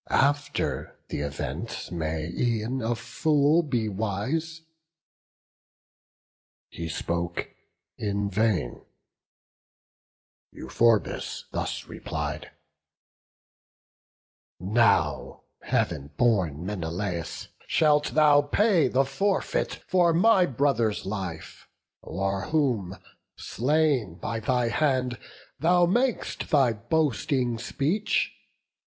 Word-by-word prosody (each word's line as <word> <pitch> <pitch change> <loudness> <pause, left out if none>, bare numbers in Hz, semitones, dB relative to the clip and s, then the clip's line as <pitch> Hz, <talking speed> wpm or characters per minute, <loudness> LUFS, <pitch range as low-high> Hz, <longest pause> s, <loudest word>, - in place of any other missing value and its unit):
After 145 +1 0
th' - - -11
event 70 +2 -4
may 80 -2 -2
e'en 120 +2 -1
a 115 +2 0
fool 150 +5 +2
be 125 -8 -1
wise." 110 +12 -2 2.1
He 85 -1 -5
spoke 85 +1 -3 0.5
in 100 -1 -1
vain; 100 - 0 1.7
Euphorbus 110 - 0
thus - - -3
replied: 75 0 -5 2.1
"Now, 90 - +1 0.2
Heav'n 70 - -1
born 90 - +1
Menelaus, 90 -2 -4 0.2
shalt 150 -1 +2
thou 150 -2 +6
pay 180 - +3
The 135 +2 +2
forfeit 195 +9 -1
for 175 -2 +3
my 190 0 +5
brother's 120 -5 0
life, 95 -5 -6 0.4
o'er 95 +2 -2
whom, 120 - 0 0.4
Slain 135 - +1
by 115 +6 -4
thy 120 +1 +1
hand, 130 -5 0 0.4
thou 175 +2 +4
mak'st 240 +7 0
thy 135 -6 +4
boasting 125 0 0
speech. 155 - 0
120 Hz, 85 wpm, -26 LUFS, 95-150 Hz, 2.1 s, thou